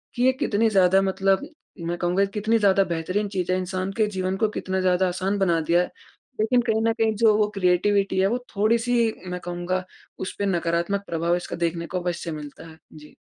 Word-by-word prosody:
कि 245 - 0
ये 260 - +6
कितनी 225 -5 +2
ज़्यादा 190 -2 +4
मतलब 195 +6 +1 0.3
मैं 170 +1 -3
कहूँगा, 180 +3 +1
कितनी 210 +3 0
ज़्यादा 195 -2 +4
बेहतरीन 185 +4 -2
चीज़ 185 -2 -2
है। 185 - +2
इंसान 185 +1 -3
के 215 -2 +3
जीवन 185 +1 -1
को 220 +2 +1
कितना 190 -2 -3
ज़्यादा 185 0 +2
आसान 185 +3 -1
बना 175 -4 +2
दिया 170 +2 +3
है। 180 - -4 0.5
लेकिन 245 +3 +3
कहीं 220 -2 0
न 225 - +2
कहीं 225 -1 +1
जो 215 0 +4
वो 210 -1 +3
क्रिएटिविटी 195 +1 +2
है, 190 - +4
वो 240 +5 0 0.2
थोड़ी 215 +3 +3
सी 235 -1 +1
मैं 180 0 -4
कहूँगा 175 +1 -2 0.4
उस 190 - -5
पे 200 - 0
नकारात्मक 175 +2 0
प्रभाव 170 +1 0
इसका 175 - -4
देखने 170 0 -3
को 180 - -3
अवश्य 175 -1 -3
मिलता 150 +1 -8
है। 160 0 -14 0.2
जी। 150 -1 -14
190 Hz, 210 wpm, -24 LUFS, 175-210 Hz, 0.5 s, ये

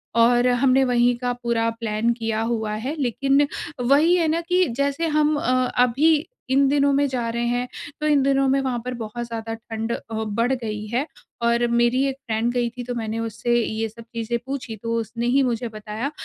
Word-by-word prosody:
और 240 +1 +4
हमने 255 +2 +3
वहीं 245 -1 +3
का 245 0 -1
पूरा 230 -1 +1
प्लान 225 0 0
किया 225 -2 -2
हुआ 220 -2 -1
है। 270 +6 -3
लेकिन 275 +3 +2 0.3
वहीं 295 +8 +4
है 335 -2 +2
ना, 325 +2 +1
कि 360 +2 +2
जैसे 280 +4 0
हम 305 0 +2
अ, 255 - 0 0.3
अभी 295 +5 +3 0.2
इन 275 +1 +4
दिनों 280 0 +3
में 285 +1 +3
जा 250 -3 -2
रहे 235 +1 -1
हैं, 245 +1 -1 0.3
तो 305 - +1
इन 295 -2 +4
दिनों 275 0 +3
में 270 +1 +3
वहाँ 255 -3 -1
पर 250 - -3
बहुत 235 0 -5
ज़्यादा 225 -1 -5
ठंड 225 0 -5
अ, - - 0 0.2
बढ़ 220 +3 0
गई 215 -4 -4
है 245 +6 -1 0.4
और 235 +1 +2
मेरी 240 +2 +2
एक 270 - -2
फ्रेंड 225 +1 0
गई 240 -1 0
थी, 245 +1 -7
तो 245 0 -4
मैंने 225 -1 -3
उससे 230 +1 -1
ये 220 +1 -2
सब 230 +2 -13
चीजें 230 +1 -2
पूछी, 255 -4 -5
तो 230 +2 -4
उसने 230 +2 -4
ही 270 +3 +3
मुझे 240 -1 -1
बताया 215 +4 -5
240 Hz, 205 wpm, -23 LUFS, 230-275 Hz, 0.4 s, और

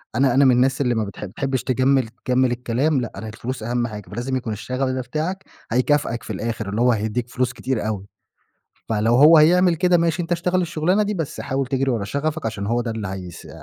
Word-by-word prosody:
أنا 130 0 +3
أنا 135 +1 +5
من 130 - +6
الناس 130 +2 +2
اللي 125 -3 +1
ما 110 - 0
بتح 100 +1 -7
تحبّش 130 +7 -3
تجمّل 130 -1 +2 0.2
تجمّل 130 0 +2
الكلام. 125 +4 0
لأ، 120 - -4
أنا 105 +3 -7
الفلوس 115 +2 -6
أهم 120 +1 -1
حاجة 105 -5 -9
فلازم 120 +5 -3
يكون 120 -4 -3
الشغف 130 +5 -2
ده 130 0 -2
بتاعك 165 +9 -3 0.3
هيكافأك 125 -1 +1
في - - -5
الآخر 110 -2 -3
اللي 110 +4 -1
هو 125 0 +5
هيديك 110 +2 -2
فلوس 125 0 -1
كتير 120 -2 -2
أوي. 100 -2 -4 0.8
فلو 110 +1 +2
هو 155 +4 +8
هيعمل 175 +3 +5
كده 180 +1 +3
ماشي 170 +1 +1
أنت 170 +1 -3
اشتغل 180 +2 +1
الشغلانة 170 +4 +1
دي، 210 0 -1
بس 160 -6 -4
حاول 135 0 -2
تجري 135 +1 0
ورا 115 -5 -1
شغفك 150 +5 -2
عشان 100 -3 -4
هو 120 +2 +1
ده 120 - -3
اللي 110 -3 -4
هيس 90 -3 -8
125 Hz, 215 wpm, -22 LUFS, 115-145 Hz, 0.8 s, هو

